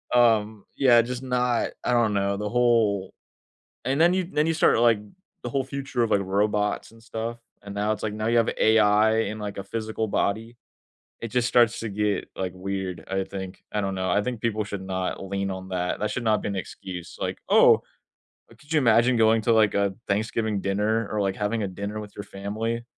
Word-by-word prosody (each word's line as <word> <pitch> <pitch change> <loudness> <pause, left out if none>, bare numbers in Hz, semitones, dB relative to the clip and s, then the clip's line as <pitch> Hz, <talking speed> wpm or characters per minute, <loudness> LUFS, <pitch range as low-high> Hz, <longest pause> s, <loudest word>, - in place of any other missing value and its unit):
um, 110 -3 +3
yeah, 120 -4 +6
just 125 +1 -5
not 125 -2 0
I 125 - +1
don't 115 -3 +3
know, 100 0 0
the 105 +1 -3
whole 115 -5 +2 0.7
And 135 +4 0
then 175 +2 +5
you 185 - +1
then 150 +1 +2
you 165 - +1
start, 155 - +3
like, 115 -2 +5 0.4
the 120 - -4
whole 135 +2 0
future 135 -2 -3
of, 115 - 0
like, 100 - +3
robots 105 +2 0
and 115 - -17
stuff 115 +1 -5 0.2
and 100 0 -8
now 105 +1 0
it's, 105 - -5
like, 105 -1 -2
now 110 +1 -3
you 120 - +3
have 115 - +2
AI 110 0 +4
in, 110 - -6
like, 105 -2 -5
a - - -3
physical 110 +1 -3
body. 110 +4 -1 0.6
It 115 - -4
just 125 +1 +1
starts 120 -1 +3
to 115 - -3
get, 105 -1 -1
like, 95 -1 -3
weird, 95 -3 -4
I 95 0 0
think. 95 -1 -7
I 105 - 0
don't 95 -1 -2
know, 95 0 -1
I 105 - +2
think 125 -1 -4
people 110 -2 -1
should 100 -1 -6
not 95 0 -3
lean 100 0 -2
on 95 0 -6
that, 90 -1 -1
that 105 - -1
should 125 - -3
not 110 -2 +2
be - - -2
an 100 - -3
excuse. 90 -2 -7
Like, - - -2
"Oh" - - +6 0.7
oh - - -16
could 150 +1 -21
you 160 - +4
imagine 120 -1 +4
going 110 0 +4
to, 115 - +2
like, 110 -2 +4
a 100 -1 +1
Thanksgiving 110 0 0
dinner 105 +3 0
or, 105 - -1
like, 95 -1 0
having 105 +1 -1
a 100 - -1
dinner 100 +3 -5
with 105 -1 -10
your 105 - -6
family 110 +4 -4
110 Hz, 215 wpm, -25 LUFS, 100-115 Hz, 0.7 s, yeah